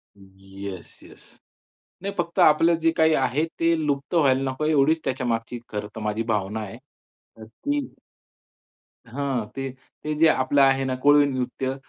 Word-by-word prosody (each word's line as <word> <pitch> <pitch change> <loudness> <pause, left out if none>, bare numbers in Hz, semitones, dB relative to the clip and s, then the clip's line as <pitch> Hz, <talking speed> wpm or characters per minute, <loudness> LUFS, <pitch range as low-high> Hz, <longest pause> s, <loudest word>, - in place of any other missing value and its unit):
Yes, 95 -2 -11
yes. - - -16 0.8
नाही 200 +1 -4
फक्त 170 -1 -2
आपलं 165 +3 +5
जे 165 0 +3
काही 160 0 +4
आहे 135 +1 +1 0.2
ते 165 0 +3
लुप्त 140 +1 -2
व्हायला 135 -5 +3
नको 130 +3 -5
आहे 155 - +2
एवढीच 155 +2 +3
त्याच्यामागची 120 -2 -2
खरं 105 0 -4
तर 110 - -6
माझी 105 +1 -2
भावना 105 -1 -1
आहे. 100 -2 -8 0.6
अ, 110 - -11
ती 285 - -3 1.3
हां. 130 -2 -3
ते, 135 0 -3 0.3
ते 155 - -2
जे 165 - +6
आपलं 140 -1 +2
आहे 135 0 +4
ना, 130 -1 -1
"कोळी 145 +3 +5
नृत्य" 130 0 -3
135 Hz, 155 wpm, -24 LUFS, 110-150 Hz, 1.3 s, जे